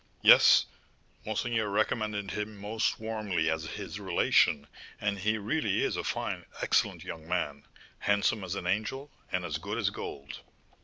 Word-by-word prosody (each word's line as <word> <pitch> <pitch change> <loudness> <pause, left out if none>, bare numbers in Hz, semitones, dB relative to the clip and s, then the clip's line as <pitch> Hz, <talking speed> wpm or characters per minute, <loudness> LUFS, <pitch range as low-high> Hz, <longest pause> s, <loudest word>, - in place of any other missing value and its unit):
"Yes; - - +8 0.6
monseigneur 110 0 0
recommended 105 -1 -1
him 105 +2 -4
most 105 +2 -1
warmly 105 -7 -1
as 80 0 -2
his - - -6
relation; 70 -1 +3 0.3
and 100 -1 -1
he 110 +3 +1
really 110 +1 0
is - - 0
a - - -2
fine, - - -3 0.2
excellent - - +1
young 80 -1 -8
man, 75 -5 -2 0.3
handsome 105 +1 +1
as 95 +1 -3
an 90 - -5
angel, 110 +10 -2 0.2
and 90 -1 -1
as 80 -1 -3
good 100 +6 -4
as 100 -4 +1
gold." 70 -7 -7
100 Hz, 150 wpm, -30 LUFS, 90-110 Hz, 0.6 s, Yes